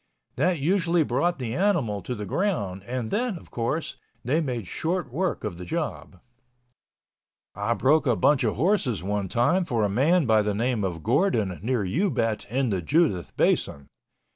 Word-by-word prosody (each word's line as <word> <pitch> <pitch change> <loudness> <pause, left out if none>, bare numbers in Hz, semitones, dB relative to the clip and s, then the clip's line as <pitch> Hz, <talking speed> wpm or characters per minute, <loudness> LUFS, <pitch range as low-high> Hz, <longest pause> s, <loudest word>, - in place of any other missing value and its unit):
That 180 -1 +1
usually 170 +2 +2
brought 170 +7 0
the 120 -4 -4
animal 145 - +1
to 125 - -4
the 105 -2 -5
ground 100 - -1
and 120 -2 -3
then, 230 -3 -1
of - - -15
course, 120 +7 -2 0.3
they 150 +7 +2
made 125 - -3
short 160 - -3
work 180 +4 -1
of 95 -5 -4
the - - -6
job. 95 - -4 1.3
I 105 +4 -1
broke 150 +4 +3
a 120 - +3
bunch 145 +4 +3
of 110 - 0
horses 135 - +1
one 100 0 -1
time 125 - +2
for 120 -9 -1
a 105 - +2
man 150 - +3
by 110 -2 +4
the 105 -1 -1
name 115 0 0
of 85 -4 -3
Gordon 115 - +1
near 115 -1 0
Ubet 115 - 0
in 130 0 0
the 95 -3 -1
Judith 95 - +1
Basin. 70 0 +1
125 Hz, 170 wpm, -25 LUFS, 105-165 Hz, 1.3 s, by